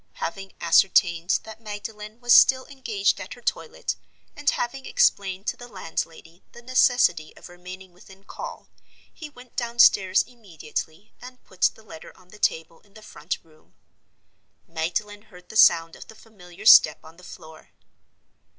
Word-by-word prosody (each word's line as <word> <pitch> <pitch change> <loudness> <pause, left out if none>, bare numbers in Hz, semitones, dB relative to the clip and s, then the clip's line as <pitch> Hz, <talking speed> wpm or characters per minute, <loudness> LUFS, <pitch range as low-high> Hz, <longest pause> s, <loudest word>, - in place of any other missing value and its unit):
Having 195 - -6
ascertained 170 0 +3
that 220 +1 -12
Magdalen 210 +1 -8
was 240 0 +4
still 260 -1 +6
engaged 220 -8 -2
at 190 - -8
her 245 - -17
toilet, - - -3 0.4
and 290 -1 0
having 265 +3 -3
explained 195 0 +1
to - - -3
the 245 - -11
landlady 165 -4 -7
the 240 - -14
necessity 245 -10 +2
of - - -13
remaining 180 +1 -12
within 190 +2 -18
call, - - -9 0.5
he 310 -3 -10
went 250 -3 -17
downstairs 235 -5 +3
immediately, 175 -5 -8
and 250 0 -13
put 185 - -21
the 220 - -18
letter 160 -7 -13
on 185 -1 -22
the 210 - -16
table 165 -2 -1
in 200 -1 -29
the 215 - -14
front 150 -3 -6
room. 155 -1 -26 0.9
Magdalen 180 +6 -4
heard 180 -4 -18
the - - -11
sound 165 -5 +5
of - - -13
the 220 - -14
familiar 200 -3 -15
step 150 -7 +8
on 160 +1 -15
the 180 - -17
floor. 160 -3 -14
200 Hz, 155 wpm, -24 LUFS, 175-235 Hz, 0.9 s, step